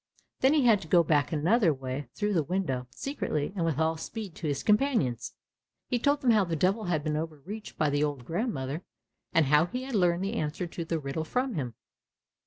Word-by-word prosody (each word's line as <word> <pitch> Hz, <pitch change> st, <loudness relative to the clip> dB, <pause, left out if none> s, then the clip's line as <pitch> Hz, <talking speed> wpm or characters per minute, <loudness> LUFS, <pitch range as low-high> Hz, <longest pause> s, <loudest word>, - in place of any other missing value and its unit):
Then 270 Hz, +4 st, +4 dB
he 285 Hz, -5 st, +3 dB
had 220 Hz, -4 st, +5 dB
to 160 Hz, -, -9 dB
go 170 Hz, +1 st, +5 dB
back 145 Hz, -2 st, +2 dB
another 170 Hz, +5 st, +3 dB
way, 130 Hz, 0 st, -4 dB
through 210 Hz, 0 st, 0 dB
the 170 Hz, -, +3 dB
window, 150 Hz, -7 st, -2 dB
secretly 155 Hz, -, -3 dB
and 180 Hz, -, -1 dB
with 165 Hz, -4 st, 0 dB
all 160 Hz, 0 st, +1 dB
speed 200 Hz, +3 st, -6 dB
to 160 Hz, -, -3 dB
his 145 Hz, -2 st, -1 dB
companions. 210 Hz, -, +1 dB, 0.6 s
He 245 Hz, -, +1 dB
told 285 Hz, +3 st, +2 dB
them 245 Hz, -, +4 dB
how 215 Hz, -3 st, +5 dB
the 170 Hz, -3 st, -2 dB
Devil 190 Hz, +7 st, +1 dB
had 165 Hz, -4 st, 0 dB
been 150 Hz, -1 st, -1 dB
overreached 165 Hz, +7 st, -6 dB
by 150 Hz, -2 st, +2 dB
the 145 Hz, +1 st, +1 dB
old 145 Hz, -5 st, -2 dB
grandmother, 165 Hz, -, -2 dB, 0.5 s
and 160 Hz, -, +4 dB
how 150 Hz, +4 st, +4 dB
he 250 Hz, +6 st, -4 dB
had 265 Hz, 0 st, -6 dB
learned 180 Hz, -3 st, +2 dB
the 200 Hz, +3 st, -2 dB
answer 155 Hz, -3 st, -2 dB
to 170 Hz, 0 st, -5 dB
the 165 Hz, 0 st, -1 dB
riddle 145 Hz, +1 st, -3 dB
from 250 Hz, +9 st, -1 dB
him. 125 Hz, -, -3 dB
165 Hz, 210 wpm, -29 LUFS, 150-210 Hz, 0.6 s, had